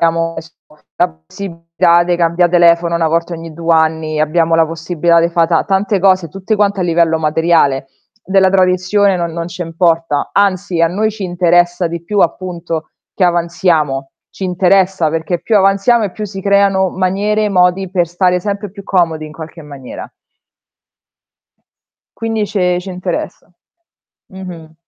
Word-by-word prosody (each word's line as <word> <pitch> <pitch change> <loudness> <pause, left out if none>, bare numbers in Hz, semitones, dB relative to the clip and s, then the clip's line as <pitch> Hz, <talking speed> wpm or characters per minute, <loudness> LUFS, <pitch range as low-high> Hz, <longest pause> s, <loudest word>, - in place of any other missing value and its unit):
abbiamo 165 0 0 0.6
la - - +2 0.2
possibilità 170 - 0
de 175 0 0
cambià 170 +1 +2
telefono 170 -1 +3
1 170 -1 +1
volta 170 +2 -1
ogni 165 0 -9
due 165 +1 -8
anni, 160 -1 +1
abbiamo 165 +2 +1
la 165 0 +4
possibilità 165 +1 +1
de 170 - +2
fa 170 -1 +2
ta 165 -1 +1
tante 195 +1 0
cose, 185 -3 +2
tutte 195 +5 -3
quante 200 -1 +1
a - - +1
livello 170 -2 +2
materiale, 155 -4 +1 0.4
della 190 0 +3
tradizione 185 +1 +2
no 170 -1 -1
non 165 0 -5
ce 175 0 -6
importa, 165 -3 0
anzi 195 -3 0
a 165 - +5
noi 210 +5 -1
ci 210 -2 -7
interessa 175 0 +2
di 170 0 -5
più 200 +3 -1
appunto 170 -2 -2 0.2
che 190 - +1
avanziamo, 170 -6 0 0.2
ci 195 - -7
interessa, 185 -2 +2
perché 165 +2 -2
più 220 - +1
avanziamo 200 +4 +3
e 195 - -4
più 215 - -6
si 195 -1 -7
creano 200 -1 +2
maniere 200 +3 0
e 210 - +1
modi 180 0 +2
per 175 -3 +1
stare 180 +1 0
sempre 200 +1 -4
più 200 0 -11
comodi 165 -4 0
in 155 - -11
qualche 160 +1 -10
maniera. 140 -3 -10 2.1
Quindi 225 -2 -2
ce 180 -3 0
ci 185 - -10
interessa. 180 0 -5 0.8
Mh-mh. 175 -4 -10
175 Hz, 155 wpm, -15 LUFS, 165-190 Hz, 2.1 s, a